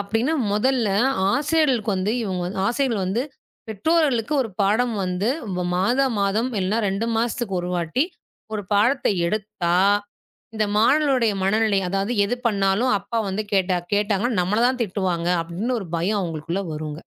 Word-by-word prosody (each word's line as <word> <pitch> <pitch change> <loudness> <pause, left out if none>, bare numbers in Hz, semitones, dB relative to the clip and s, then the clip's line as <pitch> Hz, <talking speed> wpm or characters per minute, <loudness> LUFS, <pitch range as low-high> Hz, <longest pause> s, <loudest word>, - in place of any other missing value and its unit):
அப்டின்னு 225 +9 0 0.2
முதல்ல 240 +1 +1 0.4
ஆசிரியர்களுக்கு 280 -8 +1
வந்து 190 +4 0
இவுங்க 185 -4 -2
வந் 190 +2 -5
ஆசிரியர்கள் 235 -5 0
வந்து 220 +6 0 0.5
பெற்றோர்களுக்கு 270 - +1
ஒரு 225 - -6
பாடம் 225 +4 +2
வந்து, 180 +3 -1 0.5
மாதா 245 +9 +2
மாதம் 210 +5 +1
இல்லன்னா, 195 +4 0
2 195 +4 -1
மாசத்துக்கு 230 -4 -1
ஒரு 175 0 -4
வாட்டி 175 - 0 0.5
1 210 - -3
பாடத்த 235 +7 +2 0.2
எடுத்தா, 195 -3 -1 0.8
இந்த 215 - +1
மாணவர்களுடைய 255 0 +3
மனநிலை 215 0 +2
அதாவது, 195 +4 -1
எது 235 +5 -1
பண்ணாலும் 200 +3 +1
அப்பா 230 +4 -4
வந்து 205 +3 -2
கேட்டா 185 -2 +2 0.2
கேட்டாங்கன்னா, 210 +2 0
நம்மள 200 +5 0
தான் 255 -1 -1
திட்டுவாங்க 180 -4 -2
அப்ன்னு 205 +10 -2
ஒரு 195 - -7
பயம் 200 +5 0
அவுங்களுக்குள்ள 170 +2 -3
வருங்க. 150 0 -5
210 Hz, 140 wpm, -23 LUFS, 190-240 Hz, 0.8 s, மாணவர்களுடைய